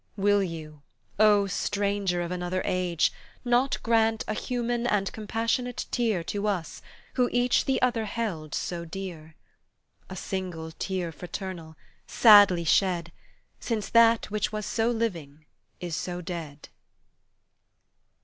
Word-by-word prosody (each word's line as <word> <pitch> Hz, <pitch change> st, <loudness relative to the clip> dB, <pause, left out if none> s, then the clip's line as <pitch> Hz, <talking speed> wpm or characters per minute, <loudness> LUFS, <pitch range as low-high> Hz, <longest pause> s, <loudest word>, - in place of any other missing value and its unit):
Will 205 Hz, 0 st, +3 dB
you, 155 Hz, -5 st, -6 dB, 0.4 s
O 210 Hz, -2 st, +5 dB
stranger 200 Hz, -2 st, -1 dB
of 170 Hz, -, -5 dB
another 180 Hz, +1 st, -2 dB
age, 180 Hz, -3 st, +1 dB, 0.3 s
Not 245 Hz, +3 st, +2 dB
grant 225 Hz, -1 st, +2 dB
a -, -, -1 dB
human 240 Hz, 0 st, -2 dB
and 200 Hz, -4 st, +1 dB
compassionate 230 Hz, +3 st, -2 dB
tear 220 Hz, -8 st, 0 dB
To 205 Hz, +4 st, -3 dB
us, 185 Hz, -6 st, -3 dB, 0.3 s
who 250 Hz, -2 st, +2 dB
each 245 Hz, 0 st, +2 dB
the 270 Hz, -, +1 dB
other 240 Hz, -3 st, +1 dB
held 185 Hz, -9 st, -4 dB
so 175 Hz, -1 st, -3 dB
dear? 165 Hz, -3 st, -8 dB, 0.7 s
A 190 Hz, -, -7 dB
single 180 Hz, -4 st, -5 dB
tear 180 Hz, 0 st, -3 dB
fraternal, 175 Hz, -1 st, -7 dB, 0.3 s
sadly 205 Hz, -6 st, +7 dB
shed, 170 Hz, 0 st, +2 dB, 0.5 s
Since 220 Hz, -4 st, -3 dB
that 230 Hz, -2 st, +4 dB
which 210 Hz, 0 st, -1 dB
was 215 Hz, -1 st, -4 dB
so 225 Hz, 0 st, 0 dB
living, 170 Hz, -11 st, -3 dB, 0.3 s
is 175 Hz, -3 st, -4 dB
so 175 Hz, +1 st, -4 dB
dead. 165 Hz, -5 st, -7 dB
195 Hz, 125 wpm, -27 LUFS, 170-225 Hz, 0.7 s, sadly